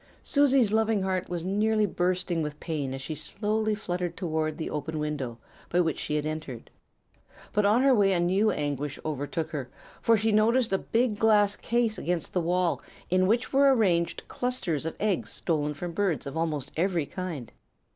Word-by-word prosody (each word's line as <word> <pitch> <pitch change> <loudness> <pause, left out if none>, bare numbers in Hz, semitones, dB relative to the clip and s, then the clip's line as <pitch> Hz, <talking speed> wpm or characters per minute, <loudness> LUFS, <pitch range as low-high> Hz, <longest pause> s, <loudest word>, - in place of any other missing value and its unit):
"Susie's 270 - +3
loving 220 -2 +2
heart 185 -1 -1
was 175 -1 -3
nearly 215 +2 +2
bursting 180 -2 0
with 150 -1 -4
pain 150 -5 -3
as 135 0 -5
she 150 - -4
slowly 215 +5 -1
fluttered 180 -4 -3
toward 160 -3 -1
the 160 - -3
open 155 +1 -4
window 145 -6 -3 0.3
by 175 - +2
which 165 -3 +1
she 150 - -2
had 150 0 0
entered. 155 -6 -5 0.8
But 210 -1 +3
on 225 +5 +4
her 275 -1 +6
way 200 -4 +4
a 175 - +1
new 190 +5 +3
anguish 145 -3 -2
overtook 155 +2 -3
her, 135 -5 -4 0.3
for 230 -1 +4
she 220 +2 +1
noticed 225 +1 +3
a 195 - +2
big 225 -2 0
glass 205 -2 +4
case 235 -2 0
against 175 -2 -2
the 180 - +1
wall 175 0 +1 0.3
in 185 0 +4
which 235 +6 +1
were 275 0 +6
arranged 175 -7 +1
clusters 190 - -2
of 160 - -4
eggs 205 -4 0
stolen 150 -2 -1
from 175 +4 -5
birds 175 -3 0
of 140 - -6
almost 150 -4 -2
every 170 -2 +1
kind. 165 - -6
180 Hz, 180 wpm, -27 LUFS, 155-215 Hz, 0.8 s, her